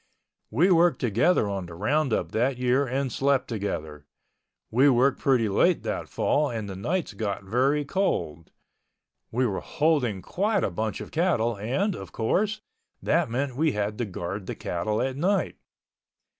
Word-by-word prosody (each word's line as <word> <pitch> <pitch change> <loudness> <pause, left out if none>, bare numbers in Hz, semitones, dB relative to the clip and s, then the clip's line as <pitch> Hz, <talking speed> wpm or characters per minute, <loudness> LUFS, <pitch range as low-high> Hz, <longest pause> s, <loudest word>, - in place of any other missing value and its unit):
We 165 - +3
worked 170 -5 +4
together 120 - +2
on 95 -3 -3
the 85 - -9
roundup 135 - 0
that 125 +3 +1
year 125 +2 +2
and 130 +1 -1
slept 135 +1 +1
together. 80 -9 -4 0.6
We 130 +5 +5
worked 130 +2 +3
pretty 125 -5 +2
late 100 - +2
that - - -3
fall 150 0 +1
and 110 -3 -4
the 95 - -6
nights 160 - -2
got 100 -1 -3
very 135 +8 +1
cold. 110 - -1 0.8
We 125 +3 +1
were 100 -5 -1
holding 135 - 0
quite 205 - 0
a - - 0
bunch 110 +5 -3
of - - -8
cattle 150 -10 +1
and, 135 - -1
of 95 -3 -9
course, 210 - 0 0.4
that - - +1
meant 130 +2 -2
we 155 +1 +1
had 105 +1 -2
to 120 - 0
guard 95 0 -5
the - - -4
cattle 95 +5 -2
at 130 0 -3
night. 190 +6 0
125 Hz, 160 wpm, -26 LUFS, 105-145 Hz, 0.8 s, We